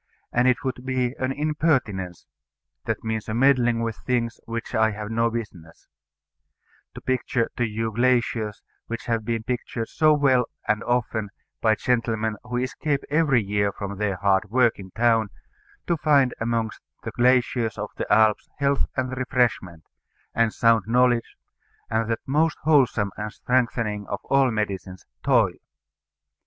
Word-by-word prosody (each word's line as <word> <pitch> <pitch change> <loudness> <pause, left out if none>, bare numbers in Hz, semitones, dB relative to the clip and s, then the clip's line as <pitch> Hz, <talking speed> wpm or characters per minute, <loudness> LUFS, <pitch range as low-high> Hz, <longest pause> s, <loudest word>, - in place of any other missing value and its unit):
And 125 +1 +3
it 125 -1 +2
would 125 -2 -3
be 130 -1 -1
an 130 0 0
impertinence 135 - -1 0.6
that - - -2
means 110 -1 -3
a 110 - -2
meddling 120 -2 +3
with 115 -2 -3
things 120 -2 -2
which 115 0 -5
I 110 0 +3
have 105 0 -6
no 115 +1 +2
business 100 -8 -7 1.1
to - - -8
picture 125 -2 -1
to 120 - +1
you 110 +1 -3
glaciers 115 -2 0 0.2
which 115 0 -5
have 115 -2 -1
been 115 0 -2
pictured 120 -1 -3
so 155 -2 +4
well 130 -4 +3 0.2
and 110 0 +1
often 110 -3 -1 0.3
by 110 -1 +4
gentlemen 115 -2 0
who 125 0 -4
escape 140 +3 -1
every 145 -6 +3
year 100 0 0
from 100 0 -6
their 100 -2 0
hard 95 +1 +1
work 120 -1 +3
in 95 -1 -9
town 115 0 +2 0.6
to 170 - +1
find 140 -4 +3
among 115 -1 -1 0.3
the - - -4
glaciers 120 -3 +2
of 105 0 -5
the - - -4
Alps 110 -1 +3
health 140 -1 +1
and 130 0 -1
refreshment, 120 -10 0 0.5
and 115 -1 +2
sound 115 -3 +3
knowledge, 120 0 +2 0.6
and 115 0 0
that 115 - -1
most 155 +3 +1
wholesome 130 -9 +3
and 105 +1 -4
strengthening 115 -5 -1
of 100 - -3
all 135 -1 +3
medicines, 100 -4 -4 0.2
toil. 115 -9 +3
115 Hz, 150 wpm, -24 LUFS, 110-130 Hz, 1.1 s, so